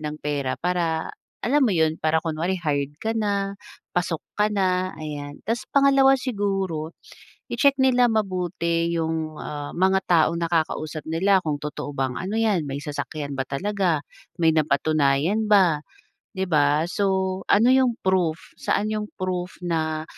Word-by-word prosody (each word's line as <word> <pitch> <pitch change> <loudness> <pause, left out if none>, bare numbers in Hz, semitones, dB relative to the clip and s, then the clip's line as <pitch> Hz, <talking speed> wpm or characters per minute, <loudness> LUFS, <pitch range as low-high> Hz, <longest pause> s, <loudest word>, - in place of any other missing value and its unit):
ng 150 0 -4
pera 145 -3 -2
para 170 -2 -1 0.3
alam 290 +5 +3
mo 220 - +2
'yun, 160 -2 +1
para 160 0 +3
kunwari 165 +3 -1
hired 145 -3 -2
ka 225 +1 -1
na, 200 -2 -1 0.4
pasok 170 -2 -1 0.2
ka 210 0 +3
na, 185 -2 +1
ayan. 145 -2 -6
Ta's 230 +3 -2
pangalawa 275 -1 +5
siguro, 195 - -2 0.6
i-check 280 -1 +4
nila 250 -2 +4
mabuti 175 -5 0
yung, 160 -1 -2
ah, 145 -1 -5
mga 190 +1 +3
taong 170 -1 +3
nakakausap 160 -2 -1
nila 190 +4 +3
kung 150 -2 -1
totoo 150 -1 -5
bang 130 -1 0
ano 195 +4 -3
'yan, 210 -8 +2
may 135 - -3
sasakyan 145 0 -5
ba 135 - -1
talaga, 180 0 0 0.4
may 165 - +5
napatunayan 155 +6 +2
ba, 185 -7 +4 0.6
'di 190 - 0
ba? 150 0 +3
So, 190 -1 0
ano 230 +5 +5
yung 255 -3 +2
proof, 180 -4 +1 0.2
saan 210 +1 0
yung 215 -1 -2
proof 185 -1 -3
na 160 -2 -1
170 Hz, 145 wpm, -24 LUFS, 155-200 Hz, 0.6 s, pangalawa